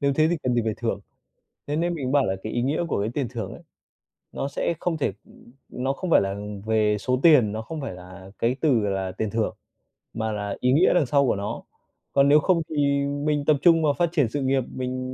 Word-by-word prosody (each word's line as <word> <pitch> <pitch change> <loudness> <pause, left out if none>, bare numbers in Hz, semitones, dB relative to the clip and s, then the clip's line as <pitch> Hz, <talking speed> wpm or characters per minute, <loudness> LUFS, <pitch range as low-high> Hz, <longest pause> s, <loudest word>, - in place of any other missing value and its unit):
nếu 140 -1 +2
thế 155 +2 +3
thì 175 - +1
cần 125 -1 0
gì 120 - +2
phải 110 -1 -1
thưởng. - - -2 0.7
Thế 145 - -2
nên 170 +2 0
mình 135 -5 -3
bảo 140 -2 +4
là 95 - -1
cái 110 - -5
ý 120 - -1
nghĩa 145 +6 0
của 140 - -1
cái 105 +2 -1
tiền 140 -3 -1
thưởng 115 -6 -5
ấy, - - -11 0.7
nó - - -3
sẽ 140 +4 -1
không 170 -2 -1
thể 145 - 0
ừm, - - -19 0.2
nó 130 +2 -2
không 185 +5 -5
phải - - +6
là 95 0 -2 0.3
về 110 -1 +2
số 125 +4 0
tiền, 145 -11 +6
nó 110 +1 -4
không 155 +7 -6
phải 135 - -5
là 95 +1 -12
cái 120 +2 +1
từ 140 -7 +3
là 95 -2 -2
tiền 105 +3 -3
thưởng, 110 +1 -1 0.6
mà 110 -1 -2
là 105 -1 -4
ý 125 - +2
nghĩa 155 +8 +4
đằng 175 -5 +3
sau 140 +2 +2
của - - +2
nó. 100 +1 -4 0.5
Còn 140 0 +4
nếu 150 +1 +7
không 170 +1 +2
thì 155 - -5 0.3
mình 145 +1 -1
tập 150 -1 +4
trung 165 -1 +5
vào 145 -2 +3
phát 170 +3 +1
triển 145 -9 +2
sự 145 +5 -3
nghiệp, 135 0 +1
mình 130 0 -3
130 Hz, 245 wpm, -24 LUFS, 110-150 Hz, 0.7 s, nếu